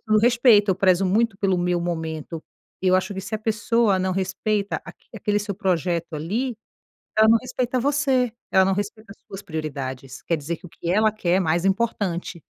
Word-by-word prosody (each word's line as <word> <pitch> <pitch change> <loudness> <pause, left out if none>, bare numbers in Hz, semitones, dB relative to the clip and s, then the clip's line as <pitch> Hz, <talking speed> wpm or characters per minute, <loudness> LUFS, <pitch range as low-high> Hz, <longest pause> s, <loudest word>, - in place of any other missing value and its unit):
o 215 0 +5
respeito, 230 -3 +5
eu - - +3
prezo 190 0 +3
muito 210 +2 +1
pelo 190 -3 +1
meu 175 0 0
momento. 160 -2 -4 0.4
Eu 185 - +1
eu - - +4
acho 190 +2 -1
que 190 - -5
se 200 +3 -6
a - - -1
pessoa 220 -2 +1
não 185 0 0
respeita 200 +2 -1
aqu - - -13
aquele 210 -1 0
seu 205 0 -3
projeto, 175 -4 -1
ali, 215 - -2 0.6
ela 220 0 +6
não 230 0 +6
respeita 255 0 -2
você, 270 -3 +1 0.2
ela 190 0 +5
não 195 - +2
respeita 205 +1 -5
as - - -23
suas 195 - -8
prioridades. 135 -6 -6
Quer 165 - 0
dizer 160 +3 -4
que 180 - -13
o - - -12
que 170 +1 -5
ela 215 +2 +3
quer 185 -4 0
é - - +2
mais 170 +1 +1
importante. 195 -4 -1
195 Hz, 200 wpm, -23 LUFS, 175-220 Hz, 0.6 s, ela